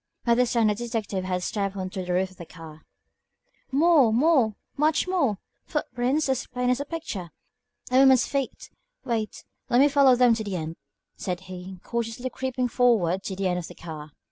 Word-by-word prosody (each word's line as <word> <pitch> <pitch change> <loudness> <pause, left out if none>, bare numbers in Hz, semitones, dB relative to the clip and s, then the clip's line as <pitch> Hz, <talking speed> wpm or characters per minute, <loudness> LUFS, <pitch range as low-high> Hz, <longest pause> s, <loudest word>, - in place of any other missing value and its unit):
By 235 - +4
this 245 0 +2
time 230 -2 +3
the 210 - +3
detective 215 -4 -3
had 180 -1 -2
stepped 200 +1 -2
on 185 -1 -4
to 190 -2 -4
the 180 - -4
roof 190 +1 0
of 185 - -19
the 170 - -9
car. 160 -2 -12 0.9
"More, 290 -4 +5
more, 250 -3 +3 0.2
much 305 +4 +2
more! 295 - +1 0.3
Footprints, 270 0 -1
as 265 -2 -1
plain 250 0 0
as 250 - +1
a 285 - -3
picture. 285 - -5 0.6
A 255 - +5
woman's 265 -2 +6
feet. 275 -2 -4 0.3
Wait, 225 -3 -3 0.3
let 240 - +4
me 280 - +7
follow 280 -3 +5
them 245 -1 +5
to 225 -1 -2
the 200 -3 -4
end," 160 -1 -5 0.4
said 180 -1 -4
he, 185 0 -9
cautiously 235 +2 -3
creeping 260 -1 -2
forward 220 -8 +2
to 190 - -3
the 190 0 -1
end 180 -1 0
of 170 - -7
the - - -12
car. 155 -3 -8
230 Hz, 195 wpm, -26 LUFS, 185-260 Hz, 0.9 s, me